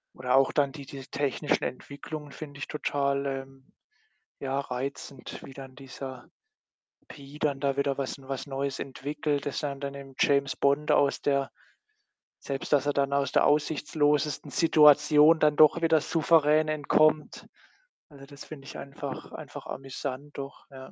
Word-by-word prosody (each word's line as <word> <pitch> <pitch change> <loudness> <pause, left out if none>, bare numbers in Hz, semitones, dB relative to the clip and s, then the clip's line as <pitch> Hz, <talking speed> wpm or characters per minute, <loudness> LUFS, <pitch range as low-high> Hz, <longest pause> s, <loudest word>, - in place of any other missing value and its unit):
oder 125 0 0
auch 135 0 +4
dann 140 -2 +2
diese 135 -1 -9
technischen 145 +1 -1
Entwicklungen 145 +3 -6
finde 145 -1 -9
ich - - -5
total, 140 -2 -1
ähm, 135 0 -7 0.7
ja, 135 0 -1
reizend, 135 0 -6
wie 135 - -11
dann 135 -1 -10
dieser 130 -2 -9 0.8
„P.“ 140 +1 -12
dann 145 -3 0
da 140 -1 0
wieder 140 -1 0
was 135 0 -3
was 135 -1 -5
Neues 135 0 -3
entwickelt, 145 +2 -3
dass 145 - -3
er 140 -1 -2
dann 140 0 -5
dem 135 -1 -10
„James 140 -1 +2
Bond“ 140 +2 +2
aus 140 -1 +3
der 140 -1 +1 0.9
selbst 135 -1 -5
dass 145 -1 +3
er 145 - +2
dann 140 0 +1
aus 140 -1 +1
der - - +4
aussichtslosesten 150 -1 +1
Situation 150 0 +6
dann 150 -1 +3
doch 155 +2 +6
wieder 165 -1 +4
souverän 155 -1 +3
entkommt. 155 0 +2 0.6
Also, 140 -2 -13
das 140 0 -12
finde 140 -3 -10
ich - - -9
einfach 140 0 -7
einfach - - -9
amüsant 135 +1 -6
doch, 140 0 -8
ja. 130 -1 -11
140 Hz, 150 wpm, -28 LUFS, 135-150 Hz, 0.9 s, Situation